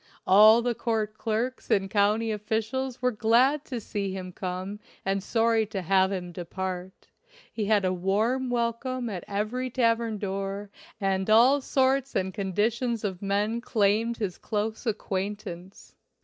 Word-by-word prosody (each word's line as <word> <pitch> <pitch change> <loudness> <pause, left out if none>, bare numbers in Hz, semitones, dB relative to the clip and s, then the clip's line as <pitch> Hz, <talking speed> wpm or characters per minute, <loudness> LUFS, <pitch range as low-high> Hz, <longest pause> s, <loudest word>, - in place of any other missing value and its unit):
All 215 +4 +7
the 245 0 +1
court 220 -2 -2
clerks 230 +4 -2
and 195 -1 +2
county 210 +3 +2
officials 225 +5 -2
were 250 - +3
glad 245 +6 +3
to 250 -3 -4
see 200 -2 -3
him 185 -1 -6
come 185 +3 -5 0.3
and 195 0 0
sorry 225 +1 +2
to 195 -3 -4
have 190 +2 +3
him 180 -2 -4
depart; 185 +1 -6 0.5
he 215 - -2
had 205 -2 +3
a 185 - +1
warm 215 +8 0
welcome 240 +1 -1
at 180 -3 -5
every 215 +6 -2
tavern 230 -3 +1
door 195 0 -4 0.3
and 195 -1 0
all 250 +6 +6
sorts 270 0 +1
and 190 0 0
conditions 220 +5 -1
of 190 -3 -3
men 205 +4 0
claimed 225 0 +1
his 200 -6 -3
close 220 +3 -3
acquaintance. 195 -3 -4
215 Hz, 145 wpm, -27 LUFS, 195-235 Hz, 0.5 s, All